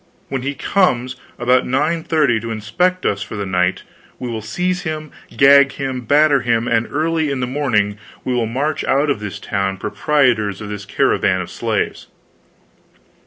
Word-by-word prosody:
When 135 Hz, -2 st, -2 dB
he 140 Hz, +2 st, -3 dB
comes 130 Hz, -11 st, +1 dB, 0.2 s
about 125 Hz, +1 st, +2 dB
nine 155 Hz, +6 st, 0 dB
thirty 150 Hz, -9 st, +2 dB
to 115 Hz, +1 st, -6 dB
inspect 180 Hz, -, -1 dB
us 100 Hz, 0 st, 0 dB
for 105 Hz, -, -6 dB
the 100 Hz, -1 st, -3 dB
night, 90 Hz, -1 st, 0 dB, 0.3 s
we 125 Hz, -, -5 dB
will 110 Hz, -1 st, -4 dB
seize 180 Hz, -, -2 dB
him, 155 Hz, -2 st, -5 dB, 0.3 s
gag 140 Hz, 0 st, +6 dB
him, 130 Hz, -2 st, -3 dB
batter 145 Hz, +1 st, +4 dB
him, 120 Hz, 0 st, 0 dB
and 115 Hz, 0 st, +1 dB
early 160 Hz, +1 st, 0 dB
in 140 Hz, -2 st, -2 dB
the 125 Hz, -, 0 dB
morning 115 Hz, -7 st, 0 dB, 0.2 s
we 130 Hz, -, -1 dB
will 120 Hz, -2 st, 0 dB
march 140 Hz, +7 st, -1 dB
out 145 Hz, +2 st, +2 dB
of 125 Hz, -, -2 dB
this 105 Hz, -2 st, -6 dB
town, 95 Hz, -2 st, -2 dB
proprietors 110 Hz, -3 st, +1 dB
of 105 Hz, -2 st, -7 dB
this 105 Hz, -1 st, -6 dB
caravan -, -, +1 dB
of -, -, -6 dB
slaves." -, -, -2 dB
130 Hz, 170 wpm, -19 LUFS, 110-150 Hz, 0.3 s, gag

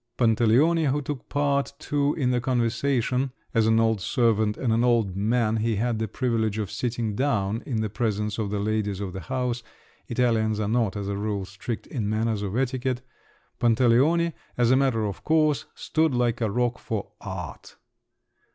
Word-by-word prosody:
Pantaleone, 125 Hz, +8 st, +3 dB
who 140 Hz, +2 st, +1 dB
took 145 Hz, -2 st, -6 dB
part 140 Hz, -1 st, 0 dB
too 145 Hz, -1 st, 0 dB
in 130 Hz, -6 st, +1 dB
the 125 Hz, -1 st, +1 dB
conversation—(as 125 Hz, -1 st, 0 dB
an 110 Hz, 0 st, +4 dB
old 110 Hz, -3 st, +2 dB
servant 110 Hz, -3 st, +1 dB
and 120 Hz, -4 st, 0 dB
an 115 Hz, +1 st, +2 dB
old 115 Hz, -6 st, +2 dB
man 110 Hz, +2 st, +1 dB
he 110 Hz, 0 st, 0 dB
had 115 Hz, +1 st, 0 dB
the 110 Hz, -, -1 dB
privilege 110 Hz, -2 st, -1 dB
of 105 Hz, -3 st, -3 dB
sitting 115 Hz, -3 st, -2 dB
down 110 Hz, -4 st, 0 dB
in 115 Hz, -5 st, -1 dB
the 110 Hz, -, -1 dB
presence 105 Hz, -1 st, -1 dB
of 105 Hz, -2 st, -1 dB
the 105 Hz, -, -2 dB
ladies 105 Hz, -1 st, -1 dB
of 95 Hz, -3 st, -4 dB
the 95 Hz, -, -5 dB
house; 125 Hz, +6 st, -2 dB, 0.5 s
Italians 115 Hz, -3 st, +1 dB
are 105 Hz, -, 0 dB
not, 110 Hz, -2 st, +1 dB
as 100 Hz, -1 st, -4 dB
a 100 Hz, -, -2 dB
rule, 100 Hz, -1 st, -2 dB
strict 100 Hz, +4 st, -6 dB
in 110 Hz, -6 st, -3 dB
matters 110 Hz, -1 st, 0 dB
of 100 Hz, +2 st, -3 dB
etiquette)—Pantaleone, 130 Hz, +3 st, 0 dB, 0.2 s
as 120 Hz, 0 st, +3 dB
a -, -, +6 dB
matter 130 Hz, -5 st, +2 dB
of 100 Hz, -2 st, -5 dB
course, 155 Hz, -2 st, +2 dB
stood 160 Hz, -4 st, 0 dB
like 120 Hz, -1 st, +1 dB
a 110 Hz, -, +1 dB
rock 120 Hz, +3 st, 0 dB
for 105 Hz, -3 st, -4 dB
art. 95 Hz, -7 st, -7 dB
115 Hz, 170 wpm, -25 LUFS, 105-125 Hz, 0.5 s, a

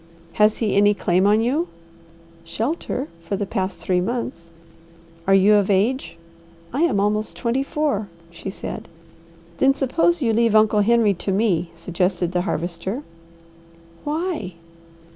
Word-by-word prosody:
"Has 210 Hz, 0 st, +3 dB
he 220 Hz, -3 st, 0 dB
any 205 Hz, +1 st, +4 dB
claim 185 Hz, 0 st, +2 dB
on 210 Hz, +2 st, +4 dB
you?" 285 Hz, +9 st, 0 dB, 0.8 s
"Shelter 250 Hz, -, -3 dB
for 165 Hz, +4 st, -4 dB
the 200 Hz, +1 st, -2 dB
past 190 Hz, 0 st, -3 dB
three 180 Hz, -1 st, +1 dB
months." 185 Hz, -6 st, -4 dB, 0.8 s
"Are 195 Hz, -, +5 dB
you 195 Hz, +2 st, +5 dB
of 205 Hz, -1 st, +3 dB
age?" 215 Hz, +8 st, +1 dB, 0.6 s
"I 280 Hz, -, 0 dB
am 260 Hz, -12 st, +2 dB
almost 210 Hz, +1 st, 0 dB
twenty 240 Hz, +2 st, 0 dB
four," 280 Hz, -8 st, -1 dB, 0.2 s
she 170 Hz, +3 st, -7 dB
said. 190 Hz, -, -7 dB, 0.7 s
"Then 270 Hz, 0 st, +4 dB
suppose 330 Hz, +6 st, +1 dB
you 235 Hz, -6 st, +1 dB
leave 230 Hz, -1 st, +3 dB
Uncle 215 Hz, -1 st, +4 dB
Henry 225 Hz, -1 st, +4 dB
to 195 Hz, +2 st, -3 dB
me," 190 Hz, -4 st, +1 dB
suggested 180 Hz, +1 st, -1 dB
the 180 Hz, -1 st, 0 dB
Harvester. 180 Hz, -, -3 dB, 1.0 s
"Why?" 305 Hz, -, -3 dB
210 Hz, 140 wpm, -22 LUFS, 190-245 Hz, 1.0 s, Are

